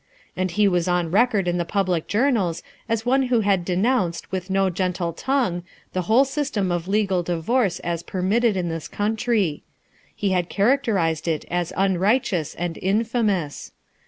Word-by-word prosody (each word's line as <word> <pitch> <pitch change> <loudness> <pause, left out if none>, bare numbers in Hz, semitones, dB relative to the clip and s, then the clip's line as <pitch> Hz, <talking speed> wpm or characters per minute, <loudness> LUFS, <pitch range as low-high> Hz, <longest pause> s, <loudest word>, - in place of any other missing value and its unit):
And 185 0 -1
he 205 +4 +2
was 180 -2 +1
on 175 -2 0
record 210 -2 +3
in 175 0 0
the - - +1
public 180 -2 -1
journals 210 - +1 0.3
as 225 0 -1
one 265 +1 +2
who 240 -2 +2
had 195 -3 +2
denounced 185 -1 0
with 185 0 -4
no 190 0 +2
gentle 180 -1 -2
tongue 245 - 0 0.3
the 185 - 0
whole 250 +5 +5
system 265 -9 -1
of 175 0 -2
legal 195 -2 +1
divorce 175 +4 0
as 170 -1 -2
permitted 200 +5 +1
in 180 -2 -1
this 165 -1 -4
country; 210 -5 0 0.5
he 200 -2 -1
had 180 -2 0
characterized 200 - +1
it 160 -2 -1
as 175 -1 -1
unrighteous 190 - +1
and 175 -1 -4
infamous. 205 - -1
190 Hz, 160 wpm, -23 LUFS, 175-220 Hz, 0.5 s, whole